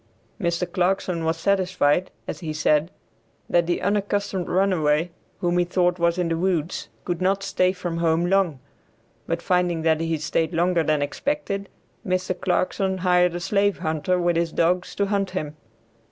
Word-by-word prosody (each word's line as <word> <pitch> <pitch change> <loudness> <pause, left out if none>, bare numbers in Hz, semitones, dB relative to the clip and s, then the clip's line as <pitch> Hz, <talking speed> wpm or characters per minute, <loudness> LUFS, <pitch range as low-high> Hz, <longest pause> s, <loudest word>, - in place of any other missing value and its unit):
Mr. 170 -2 0
Clarkson 180 -2 0
was 160 0 0
satisfied, 185 -4 +1 0.2
as - - -5
he 160 -3 -4
said, 155 +1 +2 0.6
that 170 -1 +2
the 175 - -1
unaccustomed 200 -1 -1
runaway, 175 -4 +2 0.3
whom 175 0 +1
he - - +4
thought 180 0 +1
was 170 0 +2
in 180 -1 0
the 165 - 0
woods 175 -2 -1 0.2
could 175 0 -2
not 195 +1 +1
stay 185 0 +2
from 175 -3 -4
home 165 0 +2
long, 180 -6 +1 0.7
but - - -2
finding 180 -3 +1
that 160 -1 +2
he 165 -1 0
stayed 160 +2 -1
longer 175 0 +2
than 155 -2 +1
expected, 200 - -3 0.3
Mr. 185 -1 -2
Clarkson 190 +1 0
hired 180 -1 +3
a - - -2
slave 200 +3 +1
hunter 160 +1 0
with 175 -1 +1
his 170 -1 0
dogs 180 +2 0
to 200 - +1
hunt 200 -1 0
him. 155 -5 -4
175 Hz, 165 wpm, -24 LUFS, 165-185 Hz, 0.7 s, he